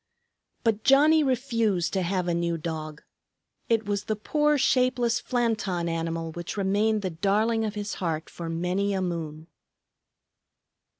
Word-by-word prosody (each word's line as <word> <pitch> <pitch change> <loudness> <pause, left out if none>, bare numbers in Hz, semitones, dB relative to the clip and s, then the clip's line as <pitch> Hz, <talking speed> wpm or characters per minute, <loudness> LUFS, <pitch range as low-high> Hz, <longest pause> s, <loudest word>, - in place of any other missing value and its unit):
But 225 -3 +1
Johnnie 300 +4 +6
refused 230 -9 0
to 190 - +1
have 180 0 -1
a 175 - +1
new 170 0 0
dog. 155 -2 -6 0.7
It 225 -2 +2
was 205 0 -2
the 215 - -1
poor, 295 +7 +1
shapeless 250 -3 +2
Flanton 215 -8 -1
animal 165 0 -2
which 175 +4 -6
remained 205 +2 +1
the 185 - -2
darling 210 +7 +1
of 215 -1 -3
his 205 -1 -4
heart 160 -3 -2
for 170 -1 -7
many 180 +4 -1
a 190 - -1
moon. 160 -3 -4
200 Hz, 140 wpm, -26 LUFS, 170-225 Hz, 0.7 s, Johnnie